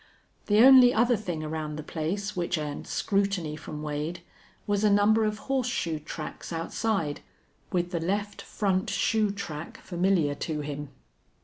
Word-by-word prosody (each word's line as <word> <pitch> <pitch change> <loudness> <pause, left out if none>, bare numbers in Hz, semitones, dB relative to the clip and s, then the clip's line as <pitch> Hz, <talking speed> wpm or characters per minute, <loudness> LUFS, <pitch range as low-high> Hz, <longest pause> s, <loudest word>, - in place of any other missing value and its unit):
The 210 +1 +5
only 260 -2 +8
other 240 +2 +4
thing 175 -7 -4
around 155 -1 -4
the 155 - -6
place 185 +7 -3
which 175 -1 -1
earned 150 -2 -5
scrutiny 195 -6 0
from 150 0 -7
Wade 155 +3 -3 0.4
was 205 0 0
a 210 - +5
number 210 +2 +4
of 215 0 -1
horseshoe 245 - -1
tracks 155 +2 -7
outside, 165 -1 -1 0.5
with 175 -1 0
the 170 - -1
left 200 +4 -2
front 195 0 -1
shoe 215 -2 +1
track 170 -6 -6
familiar 175 -4 +1
to 150 +1 -3
him. 145 -1 -5
180 Hz, 145 wpm, -27 LUFS, 155-205 Hz, 0.5 s, only